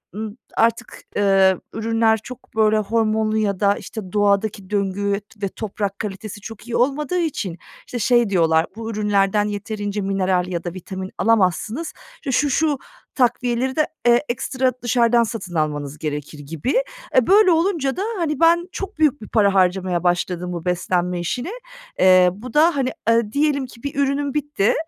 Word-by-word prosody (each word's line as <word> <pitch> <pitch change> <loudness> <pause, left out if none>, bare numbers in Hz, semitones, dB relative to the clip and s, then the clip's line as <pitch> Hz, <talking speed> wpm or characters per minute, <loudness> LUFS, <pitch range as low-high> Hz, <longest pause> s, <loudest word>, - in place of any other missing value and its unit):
ımm, 215 +1 -5 0.2
artık, 230 0 0
eee, 195 -2 +4 0.2
ürünler 225 0 +2
çok 250 -2 -12
böyle 215 0 +4
hormonlu 220 0 +1
ya 200 -3 0
da, 200 -1 +3
işte, 205 -5 -8
doğadaki 200 -1 +1
döngü 200 0 -1 0.2
ve 200 - -1
toprak 200 -1 -4
kalitesi 205 0 -6
çok 225 +2 -10
iyi 235 - -3
olmadığı 290 +7 +1
için, 220 - -2 0.3
işte, 245 - -5
şey 240 -1 +3
diyorlar: 165 -3 +3
"Bu 225 0 -5
ürünlerden 205 -1 +1
yeterince 205 0 -3
mineral 190 -2 0
ya 170 -2 -3
da 175 - -4
vitamin 190 +1 -7
alamazsınız, 225 - +1 0.2
işte, 275 - -5
şu 290 +3 +2
şu 295 +1 +1 0.4
takviyeleri 250 0 +1
de, 310 - +2 0.2
eee, 240 0 +5
ekstra 255 +2 0
dışarıdan 235 -1 +3
satın 210 -6 -5
almanız 150 -2 -2
gerekir." 150 0 -5
gibi. 165 - -1 0.3
Eee, 255 - +4
böyle 400 -1 +6
olunca 330 -5 +1
da, - - -1 0.2
hani, 305 -5 -1
ben 340 +2 +4
çok 395 +1 -6
büyük 295 -5 +2
bir 215 - -8
para 200 -3 +3
harcamaya 185 -2 +1
başladım 180 0 0
bu 170 0 -6
beslenme 180 0 0
işine. 245 - -3 0.5
Eee, 185 -1 +6
bu 225 +4 -10
da, 320 +2 +4
hani, 265 -2 0 0.2
aaa, 230 -2 +3
diyelim 285 -1 +1
ki 235 -1 -15
bir 280 - -4
ürünüm 280 0 0
bitti 290 -8 +1
215 Hz, 160 wpm, -21 LUFS, 190-255 Hz, 0.5 s, böyle